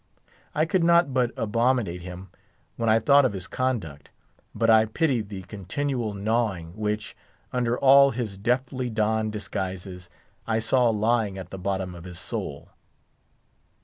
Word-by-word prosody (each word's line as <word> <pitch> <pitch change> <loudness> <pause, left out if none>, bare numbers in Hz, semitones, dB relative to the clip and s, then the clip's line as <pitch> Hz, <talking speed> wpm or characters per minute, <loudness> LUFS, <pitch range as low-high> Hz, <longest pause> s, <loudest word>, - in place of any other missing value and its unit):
I 155 - +3
could 170 +1 +1
not 170 -4 +4
but 125 -2 +2
abominate 115 -5 0
him 90 +2 -9 0.4
when 115 -1 0
I 110 - +5
thought 140 +4 +5
of 130 - +1
his 95 -2 -5
conduct; 110 - -3 0.5
but 115 - +1
I 110 -1 +6
pitied 115 -2 0
the 95 -2 -7
continual 110 +4 -3
gnawing 100 -5 -1
which, 105 0 -3 0.4
under 120 -1 0
all 140 +1 +7
his 115 -6 -4
deftly 125 +3 -1
donned 110 0 0
disguises, 95 -4 -5 0.4
I 110 -1 +1
saw 120 +2 +3
lying 110 -2 +1
at 90 -2 -8
the 95 - -7
bottom 95 -1 -2
of 85 0 -11
his 90 -1 -9
soul. - - -5
110 Hz, 145 wpm, -25 LUFS, 95-125 Hz, 0.5 s, all